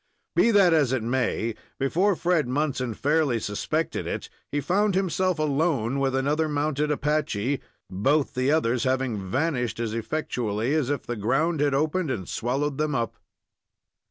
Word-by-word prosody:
Be -, -, +5 dB
that 195 Hz, -6 st, +5 dB
as 145 Hz, -6 st, +3 dB
it 125 Hz, -4 st, 0 dB
may, 120 Hz, -1 st, 0 dB, 0.2 s
before 180 Hz, +9 st, +2 dB
Fred 170 Hz, -5 st, +1 dB
Munson 130 Hz, -3 st, -1 dB
fairly 145 Hz, -4 st, +1 dB
suspected 105 Hz, -1 st, -2 dB
it -, -, -4 dB, 0.2 s
he 145 Hz, -, 0 dB
found 190 Hz, +7 st, +1 dB
himself 185 Hz, -1 st, +1 dB
alone 140 Hz, -4 st, +1 dB
with 135 Hz, -1 st, +1 dB
another 150 Hz, +4 st, +1 dB
mounted 150 Hz, 0 st, 0 dB
Apache, 145 Hz, -4 st, 0 dB, 0.3 s
both 135 Hz, +10 st, +1 dB
the 130 Hz, +2 st, 0 dB
others 125 Hz, -6 st, +2 dB
having 130 Hz, -7 st, -1 dB
vanished 130 Hz, -, -1 dB
as 115 Hz, -2 st, -2 dB
effectually 115 Hz, -1 st, -2 dB
as 150 Hz, -5 st, +1 dB
if 145 Hz, -3 st, -1 dB
the 120 Hz, -, -4 dB
ground 145 Hz, +10 st, +1 dB
had 145 Hz, -1 st, +2 dB
opened 155 Hz, +3 st, 0 dB
and 95 Hz, -8 st, -3 dB
swallowed 135 Hz, +5 st, -2 dB
them 155 Hz, -2 st, 0 dB
up. 115 Hz, -3 st, -1 dB
140 Hz, 155 wpm, -25 LUFS, 120-155 Hz, 0.3 s, Be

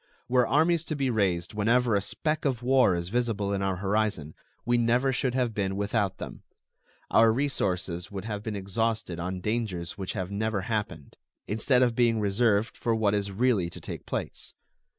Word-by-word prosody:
Were 125 Hz, -1 st, +3 dB
armies 160 Hz, +3 st, +3 dB
to 155 Hz, -, -3 dB
be 135 Hz, -3 st, 0 dB
raised 90 Hz, -6 st, 0 dB
whenever 115 Hz, +3 st, +2 dB
a 100 Hz, -, +3 dB
speck 155 Hz, +9 st, -2 dB
of 130 Hz, -4 st, -1 dB
war 130 Hz, -7 st, +4 dB
is 85 Hz, 0 st, -3 dB
visible 110 Hz, -3 st, -1 dB
in 100 Hz, -, -1 dB
our 95 Hz, -1 st, 0 dB
horizon, 100 Hz, -5 st, -1 dB, 0.3 s
we 120 Hz, -, +2 dB
never 120 Hz, +3 st, +2 dB
should 125 Hz, 0 st, 0 dB
have 125 Hz, -3 st, 0 dB
been 95 Hz, -2 st, -1 dB
without 100 Hz, -1 st, 0 dB
them. -, -, -8 dB, 0.7 s
Our 115 Hz, 0 st, +6 dB
resources 95 Hz, -9 st, -1 dB
would 100 Hz, 0 st, -6 dB
have 105 Hz, -2 st, -4 dB
been 110 Hz, 0 st, -4 dB
exhausted 100 Hz, -1 st, -2 dB
on 90 Hz, +1 st, -4 dB
dangers 105 Hz, -5 st, -3 dB
which 95 Hz, +2 st, -3 dB
have 95 Hz, -3 st, -4 dB
never 110 Hz, 0 st, -1 dB
happened, 105 Hz, -, -4 dB, 0.3 s
instead 125 Hz, +4 st, +2 dB
of 120 Hz, -2 st, +2 dB
being 115 Hz, -1 st, +2 dB
reserved 105 Hz, +1 st, +1 dB
for 115 Hz, -1 st, 0 dB
what 105 Hz, -2 st, +2 dB
is 100 Hz, -1 st, -1 dB
really 105 Hz, -4 st, +1 dB
to -, -, -9 dB
take -, -, -8 dB
place. -, -, -5 dB
110 Hz, 180 wpm, -27 LUFS, 95-120 Hz, 0.7 s, Our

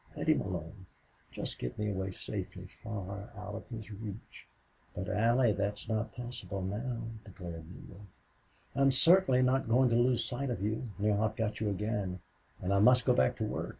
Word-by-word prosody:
Let -, -, -3 dB
him -, -, +5 dB
alone. 90 Hz, +2 st, -5 dB, 0.4 s
Just -, -, -4 dB
get -, -, -4 dB
me 105 Hz, -1 st, 0 dB
away 95 Hz, -1 st, -2 dB
safely, 95 Hz, -, -5 dB, 0.2 s
far 100 Hz, 0 st, -5 dB
out 105 Hz, 0 st, -6 dB
of 110 Hz, -, -7 dB
his 110 Hz, -2 st, -7 dB
reach." 105 Hz, 0 st, -8 dB, 0.5 s
"But, 95 Hz, +2 st, -3 dB
Allie, 115 Hz, +2 st, +4 dB
that's 100 Hz, 0 st, -2 dB
not 110 Hz, 0 st, -1 dB
possible 120 Hz, -6 st, -5 dB
now," 115 Hz, +5 st, -3 dB, 0.2 s
declared 85 Hz, -5 st, -8 dB
Neale, 100 Hz, +2 st, -12 dB, 0.7 s
"I'm 135 Hz, +1 st, +4 dB
certainly 135 Hz, -1 st, +5 dB
not 130 Hz, 0 st, +2 dB
going 125 Hz, +2 st, +5 dB
to -, -, +4 dB
lose 120 Hz, -1 st, +3 dB
sight 130 Hz, +3 st, -2 dB
of 115 Hz, -6 st, -2 dB
you, 110 Hz, +4 st, -1 dB
now 105 Hz, 0 st, +2 dB
I've 110 Hz, 0 st, 0 dB
got 110 Hz, -1 st, -1 dB
you 105 Hz, -1 st, +1 dB
again. 100 Hz, -2 st, -2 dB, 0.4 s
And 95 Hz, +2 st, +1 dB
I 100 Hz, -, +4 dB
must 125 Hz, +4 st, +6 dB
go -, -, +5 dB
back 65 Hz, 0 st, +3 dB
to -, -, -3 dB
work. -, -, -2 dB
105 Hz, 185 wpm, -32 LUFS, 100-120 Hz, 0.7 s, must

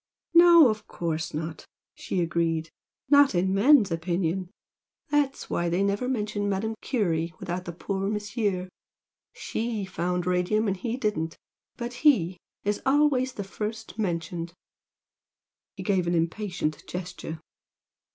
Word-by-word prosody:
"No, 340 Hz, -3 st, +9 dB
of 215 Hz, -1 st, -3 dB
course 160 Hz, -2 st, -3 dB
not!" 160 Hz, +1 st, -5 dB, 0.3 s
she 185 Hz, -, -2 dB
agreed 165 Hz, -1 st, 0 dB, 0.4 s
"Not 285 Hz, -5 st, +6 dB
in 190 Hz, +2 st, +2 dB
men's 220 Hz, -, +5 dB
opinion. 170 Hz, +2 st, -1 dB, 0.6 s
That's 290 Hz, -2 st, +1 dB
why 175 Hz, 0 st, 0 dB
they 175 Hz, +3 st, +1 dB
never 200 Hz, +5 st, 0 dB
mention 210 Hz, -4 st, -1 dB
Madame 205 Hz, +3 st, -1 dB
Curie 170 Hz, -, -1 dB
without 180 Hz, -1 st, -4 dB
the 175 Hz, -, -4 dB
poor 195 Hz, +3 st, -3 dB
Monsieur! 205 Hz, -3 st, -1 dB, 0.7 s
SHE 225 Hz, -3 st, -3 dB
found 180 Hz, -1 st, -2 dB
radium 180 Hz, +5 st, +1 dB
and 195 Hz, -1 st, 0 dB
he 235 Hz, +4 st, -3 dB
didn't, 210 Hz, -10 st, -2 dB, 0.4 s
but 240 Hz, 0 st, -4 dB
'he' 190 Hz, -, +4 dB, 0.3 s
is 205 Hz, 0 st, -1 dB
always 270 Hz, -2 st, +3 dB
first 215 Hz, +2 st, -5 dB
mentioned." 170 Hz, -3 st, -3 dB, 1.2 s
He -, -, -6 dB
gave 190 Hz, -4 st, +1 dB
an 175 Hz, -, +1 dB
impatient 170 Hz, -1 st, -1 dB
gesture. 180 Hz, -3 st, -6 dB
195 Hz, 125 wpm, -27 LUFS, 170-220 Hz, 1.2 s, No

